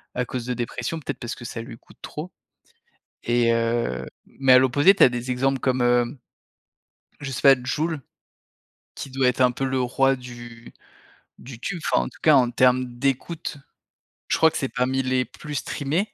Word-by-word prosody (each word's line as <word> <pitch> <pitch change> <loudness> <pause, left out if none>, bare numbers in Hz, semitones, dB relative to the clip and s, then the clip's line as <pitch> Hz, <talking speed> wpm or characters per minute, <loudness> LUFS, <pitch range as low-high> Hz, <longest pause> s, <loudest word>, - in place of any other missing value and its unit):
à 125 - -1
cause 125 0 -5
de 125 - -2
dépression, 120 +7 -4
peut-être, 145 -4 -6
parce 120 - -5
que 120 - -11
ça 115 - -5
lui 115 0 -10
coûte - - -21
trop. 160 +5 -7 0.9
Et 120 0 +2
heu, 115 - -1 0.2
mais 135 -1 +3
à 125 - +8
l'opposé, 145 +8 +5
tu - - -4
as - - +8
des 120 +1 -4
exemples 135 +2 0
comme, 130 0 0
heu, 120 0 +3 1.2
je 140 -2 -5
sais - - -4
pas, 135 -2 +6
Jul, 155 +3 -2 0.9
qui 135 - -7
doit 130 -1 +2
être 125 - -1
un 125 - +5
peu 135 - -3
le 130 0 0
roi 135 +2 +2
du 120 -2 -11 0.7
du 125 -2 -11
tube, 180 +7 -4
enfin - - +3
en - - -6
tout - - -20
cas, 155 -2 +6
en 125 -2 +4
termes 125 0 +2
d'écoute, 145 +4 -2 0.7
je - - +2
crois 160 - +5
que - - -4
c'est 135 - -2
parmi 130 +2 0
les 130 0 0
plus 150 -1 -9
streamés. 155 +9 -2
130 Hz, 190 wpm, -23 LUFS, 120-135 Hz, 1.2 s, à